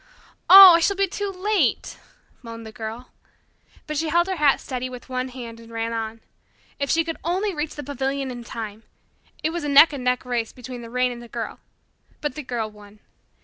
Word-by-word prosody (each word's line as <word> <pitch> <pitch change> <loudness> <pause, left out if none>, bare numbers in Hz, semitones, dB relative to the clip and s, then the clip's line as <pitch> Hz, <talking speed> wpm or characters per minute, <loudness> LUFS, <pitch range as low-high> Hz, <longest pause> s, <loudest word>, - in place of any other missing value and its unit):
"Oh, 385 -1 +12
I 335 - +5
shall 400 +4 +1
be 395 +1 +2
too 405 +2 -4
late," 395 +2 -1 0.4
moaned 230 -2 -9
the 220 - -9
Girl. 225 +3 -8 0.7
But 305 -1 -4
she 320 +1 -1
held 345 +2 +3
her 380 -1 -3
hat 295 -3 +3
steady 255 -1 -5
with 250 +1 -11
one 255 0 -2
hand 240 -3 -9
and 230 0 -14
ran 230 0 -3
on. 225 0 -4 0.6
If 280 -1 -2
she 330 - +3
could 330 0 -5
only 375 +4 -1
reach 300 -1 -4
the 295 - -6
pavilion 270 0 -3
in 240 -1 -8
time! 220 -2 -7 0.6
It 315 - 0
was 340 -1 -4
a 295 - -2
neck 285 +3 +7
and 270 -3 -5
neck 250 0 0
race 240 -2 -2
between 250 0 -9
the 230 - -9
rain 250 +1 0
and 240 -1 -8
the 240 - -11
Girl, 230 0 -6 0.6
but 295 -3 -3
the 300 - -6
Girl 235 -5 -4
won. 210 0 -16
255 Hz, 210 wpm, -23 LUFS, 230-320 Hz, 0.7 s, Oh